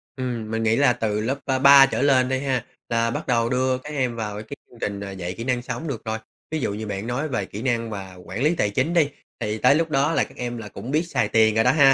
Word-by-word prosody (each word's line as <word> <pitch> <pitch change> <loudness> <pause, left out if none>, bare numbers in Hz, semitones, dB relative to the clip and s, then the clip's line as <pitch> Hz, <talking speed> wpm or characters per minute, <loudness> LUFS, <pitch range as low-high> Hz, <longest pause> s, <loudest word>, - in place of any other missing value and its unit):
Ừm, 120 -4 -4
mình 115 0 -1
nghĩ 110 0 +3
là 135 -2 +4
từ 105 -3 -1
lớp, 135 +5 -1
ơ, 130 -1 0
3 140 0 +9
trở 135 - -2
lên 130 -2 +4
đi 130 0 0
ha. 130 -3 -1 0.2
Là 115 0 +1
bắt - - -4
đầu 115 -2 +2
đưa 130 0 +1
các 140 +3 -10
em 130 -4 -1
vào 105 -2 -4
cái 140 +6 -9
chương 120 - -17
trình 100 -1 -4
dạy 90 0 -4
kỹ 115 - -4
năng 125 -1 0
sống 125 +5 -5
được 120 -5 -5
rồi. 110 0 -2 0.3
Ví 160 - -1
dụ 100 - -1
như 110 +1 -5
bạn 100 +2 -4
nói 130 +6 -1
về 105 -8 -2
kỹ 105 +3 -8
năng 115 -3 0
mà 95 -3 -7
quản 105 +9 -4
lý 160 +3 +3
tài 105 - +1
chính 130 +11 0
đi, 155 -4 +3 0.3
thì 105 +1 -2
tới 125 +5 +5
lúc 165 +1 +1
đó 140 +2 +2
là - - +2
các - - -11
em 120 -1 -4
là 110 -2 -7
cũng 125 +5 -7
biết 155 +3 +2
xài - - 0
tiền 110 -1 +4
rồi 110 - +4
đó 125 - +5
ha. 140 -3 +6
120 Hz, 285 wpm, -23 LUFS, 110-135 Hz, 0.3 s, 3